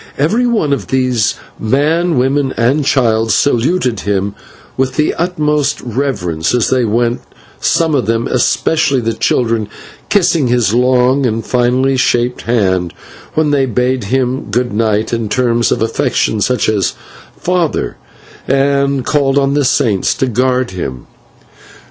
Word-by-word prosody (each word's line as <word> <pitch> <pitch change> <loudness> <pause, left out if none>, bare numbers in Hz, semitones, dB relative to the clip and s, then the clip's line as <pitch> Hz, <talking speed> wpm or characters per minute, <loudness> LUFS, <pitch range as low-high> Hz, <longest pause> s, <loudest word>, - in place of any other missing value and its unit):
Every 215 - +1
one 210 -12 +1
of 140 - -3
these, 125 -4 +1 0.2
man, 155 +8 +1
woman, 135 +2 0
and 130 +6 +2
child, 115 -5 +1
saluted 130 - +1
him 100 0 -1 0.4
with 130 -1 -1
the 150 - +1
utmost 150 -5 0
reverence 115 - -2
as 120 - +1
they 130 -2 +2
went, 120 +2 0 0.4
some 165 -2 +1
of 130 -6 0
them, 115 +1 0
especially 135 +2 +1
the 115 -1 -1
children, 115 -2 0 0.4
kissing 170 -8 +2
his 120 -4 +1
long 125 +2 +2
and 115 -1 -3
finely 125 +2 +1
shaped 120 0 0
hand 95 -7 0 0.4
when 155 -1 +2
they 135 -2 +2
bade 125 0 -1
him 130 +3 -1
good 120 +2 -1
night 110 0 0
in 115 -2 -2
terms 120 0 +1
of - - +1
affection, 110 -1 0
such 125 +4 +1
as 105 -3 0 0.4
"father," 175 -3 -1 0.5
and 140 -1 +1
called 140 -2 +1
on 140 0 +2
the 145 0 +1
Saints 120 -7 +1
to - - 0
guard 125 0 0
him. 65 -9 -6
125 Hz, 140 wpm, -14 LUFS, 115-140 Hz, 0.5 s, and